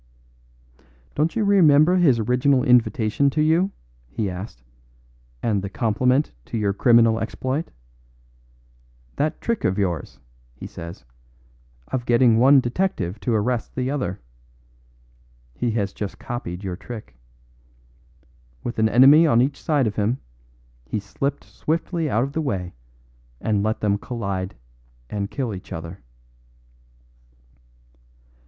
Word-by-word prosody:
"Don't 155 +2 0
you 225 - +1
remember 175 -3 +5
his 150 -9 +4
original 125 +4 +2
invitation 125 0 +3
to 150 +3 0
you?" 165 +5 +3 0.4
he 100 - -2
asked, 90 - -8 0.8
"and 105 -4 +1
the 100 - -5
compliment 125 +7 +1
to - - -4
your 100 -2 0
criminal 115 +1 +4
exploit? 130 +7 -3 1.5
'That 150 +2 -1
trick 235 -2 -2
of 95 - +1
yours,' 90 -9 -2 0.4
he - - -9
says, 85 -4 -9 0.8
'of 120 -2 -3
getting 120 -1 +4
one 135 +3 +7
detective 120 - -2
to 110 +3 0
arrest 115 +2 -1
the 130 +1 -1
other'? 125 -11 -3 1.3
He 115 - -2
has 100 -3 -1
just 105 -2 -5
copied 105 -7 -6
your 95 -2 -3
trick. 105 - -9 1.5
With 120 - -4
an 110 0 +3
enemy 140 +8 +7
on 120 -6 +4
each 140 +3 0
side 145 -4 +1
of 105 - -3
him, 110 +4 +1 0.7
he 65 - -3
slipped 140 +7 -3
swiftly 165 0 -2
out 115 -1 +1
of 140 +1 -4
the 160 - -1
way 95 - -3 0.7
and 105 -2 0
let 110 +2 -1
them 100 -1 +1
collide 100 - -4 0.6
and 100 -1 -3
kill 130 -6 -3
each 95 - -10
other." 85 +3 -7
120 Hz, 125 wpm, -23 LUFS, 100-140 Hz, 1.5 s, one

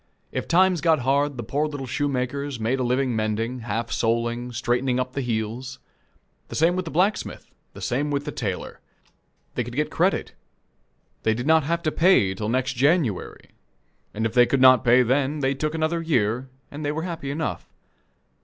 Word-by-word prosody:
If - - -3
times 180 -1 +3
got 160 -4 +3
hard, 140 +2 +1
the 120 - -4
poor 145 +7 -1
little 145 -3 -5
shoemakers 140 0 -2
made 120 +4 0
a - - 0
living 125 0 0
mending, 110 +3 -1
half 115 0 -3
soling, 120 +1 -1
straightening 125 +2 0
up 125 0 -3
the 140 - -2
heels. 120 +2 -3 0.7
The - - -8
same 165 +3 +3
with 185 0 -2
the - - -5
blacksmith; 190 +5 -1 0.2
the - - -11
same 140 +4 -1
with 145 0 -1
the 150 - -3
tailor. 100 -9 -4 0.7
They - - -1
could - - -8
get - - -1
credit - - 0 0.9
they 110 0 +1
did 120 +2 -4
not 160 -1 +4
have 170 +2 -1
to 155 - +1
pay 165 - +4
till 105 +2 -4
the - - -1
next 130 +1 0
January, 135 - 0 0.6
and 110 +2 -3
if 115 - -1
they 120 -1 +5
could 135 - +1
not 130 -2 +7
pay 125 +1 +5
then, 140 +4 0
they 135 0 +1
took 155 +3 -2
another 160 +1 0
year, 125 -5 0 0.2
and 150 +2 -7
they 145 - 0
were 160 +2 -3
happy 165 -6 -5
enough. 155 +3 -3
130 Hz, 190 wpm, -24 LUFS, 120-150 Hz, 0.9 s, not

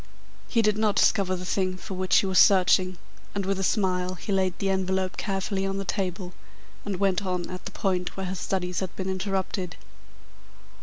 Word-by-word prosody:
He 230 -2 +2
did 210 0 +2
not 215 -2 +2
discover 195 -3 +3
the 180 0 -6
thing 185 0 0
for 190 - -8
which 185 0 +2
he - - +4
was 190 -1 +3
searching, 185 -1 +5 0.4
and 200 -1 -1
with 195 0 0
a - - -1
smile 185 -2 +1
he 185 - -6
laid 190 -2 +1
the 195 -1 0
envelope 190 0 0
carefully 195 -1 -2
on 195 0 -1
the 195 - -3
table, 185 -2 -3 0.5
and 205 -2 -2
went 195 0 +2
on 180 -2 -2
at 180 0 -7
the - - -6
point 185 -2 -1
where 190 - -2
his 185 0 -4
studies 180 -2 -1
had 190 -2 -5
been 190 - -4
interrupted. 190 -2 -2
190 Hz, 195 wpm, -26 LUFS, 185-195 Hz, 0.5 s, searching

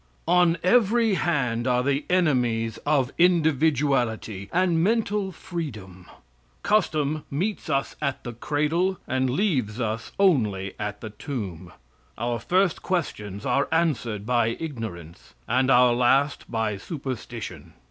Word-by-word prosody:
On 175 -1 +4
every 225 +2 +3
hand 130 -10 0
are 125 0 +2
the 140 +2 0
enemies 125 -11 +1
of 140 -3 +2
individuality, 140 - +2
and 175 -2 +2
mental 210 -2 +1
freedom. 110 - -7 0.6
Custom 155 -7 +1
meets 185 +6 -2
us 140 -2 -1
at 140 -2 -2
the 120 - -6
cradle, 150 +9 0
and 130 0 0
leaves 130 - 0
us 115 -1 -3
only 105 - +2
at 105 -1 -4
the 110 - -7
tomb. 100 - -6 0.5
Our 120 +1 -2
first 185 - +1
questions 105 - -3
are 140 +3 +1
answered 120 -11 0
by 120 -1 +1
ignorance, 85 - -7
and 130 +1 +2
our 125 -1 +6
last 135 +4 +2
by 110 -3 -1
superstition. 125 - -7
135 Hz, 120 wpm, -25 LUFS, 115-165 Hz, 0.6 s, our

